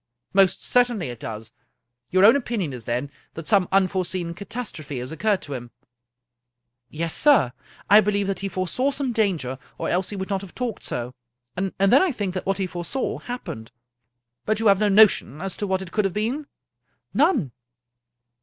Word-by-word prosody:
" - - -57
Most 195 -2 +3
certainly 240 - +2
it 120 -2 -8
does. 110 0 -7 0.6
Your 185 +2 +5
own 225 - +8
opinion 225 - -2
is, 120 -3 -8
then, 125 +4 -2 0.2
that 165 - -7
some 195 -4 +3
unforeseen 185 -2 +1
catastrophe 180 - -6
has 125 +3 -5
occurred 205 +4 0
to 145 - -6
him? 120 -2 -6 0.4
" 125 0 -60
" 120 - -58 0.2
Yes, 165 +3 -3
sir. 220 - +4 0.3
I 210 +2 +8
believe 205 -1 0
that 195 0 -2
he 195 - -2
foresaw 190 +9 0
some 275 -2 -2
danger, 170 - 0 0.2
or - - -2
else 180 +1 0
he 205 - -5
would 190 +1 -5
not 195 -1 0
have 195 -3 -11
talked 245 -4 -3
so. 120 +1 -4 0.4
And 190 +1 -2
then 195 +7 +5
I 375 -3 +2
think 205 -7 -3
that 185 - -5
what 195 -1 +1
he 195 - 0
foresaw 180 +9 -3
happened." 180 - -7 0.4
" 120 0 -57
But 215 0 +1
you 225 - -2
have 195 -1 +5
no 210 -1 +3
notion 200 - +5
as 195 +1 -4
to 205 - -2
what 190 0 0
it 185 - -11
could 210 -2 +1
hiave 195 - -1
been?" 245 +9 -2 0.4
" - - -48
None." 255 - +2
190 Hz, 200 wpm, -24 LUFS, 145-215 Hz, 0.6 s, own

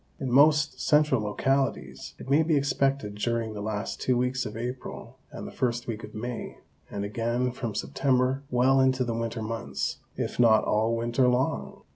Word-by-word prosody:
In 130 -2 -3
most 150 +3 +4
central 150 -6 +3
localities 135 +6 -1
it - - -10
may 140 +4 +4
be 160 -1 +2
expected 135 -5 0
during 115 +1 -2
the 105 - -6
last 105 -2 -4
two 125 -1 +2
weeks 125 0 0
of 105 - -7
April 125 0 -6
and - - -7
the - - -7
first 120 -2 -1
week 110 -1 -5
of - - -10
May, 120 +2 -5 0.3
and 100 0 -4
again 120 +4 -1
from 120 -4 -5
September 130 +1 +1
well 130 +2 +3
into 130 -1 +3
the 120 -2 -2
winter 115 0 -3
months, 115 +1 -3 0.2
if - - -3
not 110 -3 +5
all 110 +2 +1
winter 120 +2 +1
long. 125 +2 -1
125 Hz, 175 wpm, -27 LUFS, 115-135 Hz, 0.3 s, not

